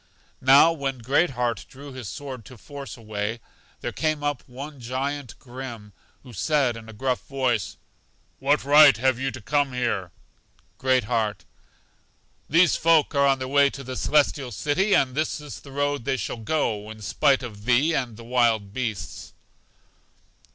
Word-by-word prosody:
Now 140 +5 +7
when 135 -4 -3
Great 140 +9 +2
heart 120 -5 -1
drew 140 +1 -11
his 125 -6 -7
sword 130 0 -7
to 130 - -12
force 140 +3 -9
a 115 - -15
way, 105 +1 -3 0.4
there - - -3
came 155 -2 -1
up 145 -3 -1
one 140 +3 -9
Giant 130 +1 -4
Grim, 120 -5 -9 0.3
who 125 -3 -13
said 130 - +1
in 115 0 -10
a - - -7
gruff 125 +3 -1
voice, 130 -6 -1 0.6
What 140 +2 +2
right 145 -2 +7
have 130 +1 +1
you 135 +1 -1
to 130 - -8
come 140 +4 0
here? 120 -7 -1 0.7
Great 130 -2 +2
heart: 105 -4 -1 1.0
These 170 +3 +5
folk 165 -1 +3
are 140 -1 +4
on 135 0 +3
their 130 -1 -5
way 140 +1 +4
to 140 0 -9
The 130 0 -6
Celestial 140 -2 +1
City, 155 - +1
and 130 -2 +2
this 155 +3 -1
is 150 -1 -9
the 140 - -13
road 145 -2 -1
they 135 -1 0
shall 125 - -4
go, 110 -4 -1
in 110 -1 -10
spite 135 +5 +2
of 105 -4 -9
thee 130 +7 +3
and 120 -7 -2
the 115 - -10
wild 115 -4 +1
beasts. 115 -6 -5
130 Hz, 170 wpm, -25 LUFS, 115-145 Hz, 1.0 s, Now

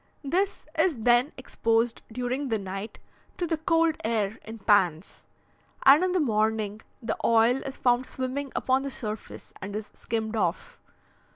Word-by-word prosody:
This 370 +8 -1
is 325 -1 +3
then 240 +4 +3
exposed 230 -2 0
during 250 +4 -2
the 225 - +1
night 195 +2 -6 0.4
to 355 - -1
the 325 -2 -1
cold 330 -1 +2
air 220 -2 -1
in 225 +1 -8
pans, 195 -5 +1 0.6
and 285 +6 +7
in 370 - +1
the 370 - +2
morning 215 -5 0 0.2
the 220 - -1
oil 230 +2 +4
is 270 0 -6
found 245 +1 +2
swimming 260 +1 -4
upon 260 +1 +2
the 275 - -3
surface 215 -5 -6
and 200 +1 -6
is 215 0 -5
skimmed 220 -1 -3
off. 180 -5 -2
235 Hz, 155 wpm, -27 LUFS, 215-275 Hz, 0.6 s, and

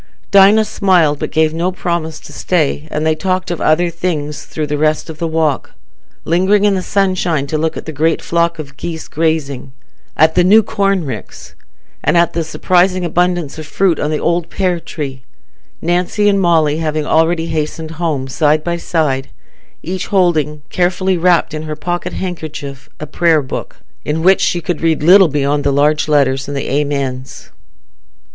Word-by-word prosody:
Dinah 200 +2 +6
smiled, 175 -9 +2
but - - -3
gave 160 0 +1
no 170 +3 -1
promise 170 -4 -3
to - - -12
stay, 155 -3 -1
and 155 0 -2
they 160 - +3
talked 185 +2 -2
of 175 - -4
other 170 +2 +2
things 155 -4 -3
through 155 - -4
the 150 0 -3
rest 155 +1 0
of 155 - -13
the 170 - -1
walk, 160 -3 -1 0.5
lingering 190 +5 +2
in 205 - +3
the 190 - -1
sunshine 185 -6 0
to 150 - -4
look 160 +1 -1
at - - -7
the 160 - -5
great 155 +2 +1
flock 170 0 0
of 140 -3 -9
geese 160 0 -6
grazing, 145 -5 -2 0.4
at 160 +1 +4
the 180 - +3
new 210 +5 +6
corn 195 -4 0
ricks, 120 -6 -8 0.5
and - - +2
at 170 -1 +3
the 165 - -1
surprising 180 +3 +1
abundance 175 -3 -1
of 155 - -8
fruit 180 -1 +1
on 150 - -1
the 155 - 0
old 170 +1 -1
pear 180 -3 -1
tree; 140 -5 -6 0.6
Nancy 180 +5 +1
and 200 -1 +3
Molly 160 -4 +2
having 155 -1 -2
already 165 +1 +2
hastened 160 0 -3
home, 145 -6 -1
side 150 +2 +1
by 170 0 -2
side, 145 -6 -1 0.5
each 185 +2 -4
holding, 155 -6 +1
carefully 185 +1 +1
wrapped 175 -2 +2
in 155 - -4
her 155 -1 -5
pocket 175 +2 -4
handkerchief, 150 -6 -6
a 155 - -5
prayer 160 0 +2
book, 130 - -6 0.3
in 160 +2 -2
which 190 +1 +4
she 175 - 0
could 170 0 -3
read 160 -2 +1
little 185 +3 +7
beyond 145 -1 0
the 140 - +1
large 150 +3 +2
letters 135 -3 +1
and 145 0 -4
the 135 - -4
Amens. 135 -3 -4
160 Hz, 180 wpm, -16 LUFS, 150-175 Hz, 0.6 s, little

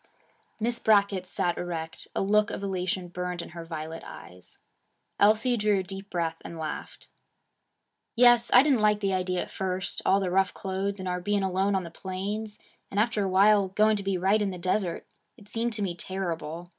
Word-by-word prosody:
Miss 235 +2 0
Brackett 200 -4 +3
sat 175 -2 -1
erect. 165 -2 -5
A - - +1
look 210 +1 +3
of - - -5
elation 185 -1 -2
burned 180 0 -4
in - - -10
her 170 0 -8
violet 160 0 -6
eyes. 90 +1 -12 0.6
Elsie 220 +4 +4
drew 210 -2 +2
a 190 - -1
deep 195 +1 -8
breath 165 -2 -2
and 170 - -8
laughed. 155 -2 -6 1.1
'Yes. 240 0 +6
I 250 - +8
didn't 280 -5 +3
like 210 -1 +3
the 195 -2 0
idea 185 -1 0
at - - -12
first: 190 0 -3
all 195 - +4
the 190 -2 -1
rough 190 +1 +2
clothes, 195 0 -3
and 185 - -5
our 180 0 -2
being 205 +2 0
alone 190 +1 +1
on 190 - 0
the 170 - -8
plains, 205 +4 -5 0.3
and 200 - -2
after 215 -1 +1
a 195 - -1
while 200 +1 +5
going 215 +3 +3
to 200 - -3
be 195 -1 -1
right 195 +4 +2
in 205 - +1
the 185 - -5
desert 180 0 -1 0.3
it 210 -4 -17
seemed 230 +2 -2
to 210 -1 -2
me 185 -3 -1
terrible. 170 -2 -5
195 Hz, 195 wpm, -27 LUFS, 180-210 Hz, 1.1 s, I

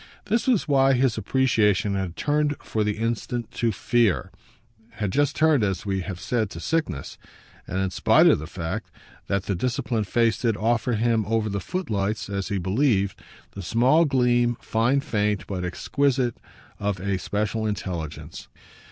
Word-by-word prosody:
This 225 +5 0
was 245 -7 +2
why 135 -2 +4
his 130 -2 +2
appreciation 110 -4 +2
had 95 -3 -3
turned 150 0 +1
for 110 - -1
the 105 0 -1
instant 115 +1 -2
to 115 -1 0
fear 110 -2 +1 0.6
had 105 -2 -2
just 145 +4 +1
turned, 155 -6 +3
as 95 -3 -1
we 95 -1 -1
have 90 -1 -6
said, 110 -2 -1
to 85 - -8
sickness; 90 - -2 0.5
and 95 - -3
in 95 -1 0
spite - - +4
of - - +5
the 75 - -7
fact 85 -2 -5 0.4
that 100 -1 0
the 100 - -2
disciplined 120 +1 -1
face 115 -1 +1
did 115 -4 +1
offer 115 +2 +1
him 115 0 +2
over 110 -1 0
the 100 0 -2
footlights, 105 - -2
as 100 -1 -2
he 100 - -1
believed, 100 +1 +1 0.3
the 100 - -8
small 125 - +3
gleam, 120 -3 +2
fine 120 +5 +1
faint 105 -5 -1
but 95 -2 -4
exquisite, 130 +6 0 0.4
of 100 -2 -1
a 95 0 -1
special 105 +3 -2
intelligence. 80 -7 -5
110 Hz, 160 wpm, -24 LUFS, 100-125 Hz, 0.6 s, of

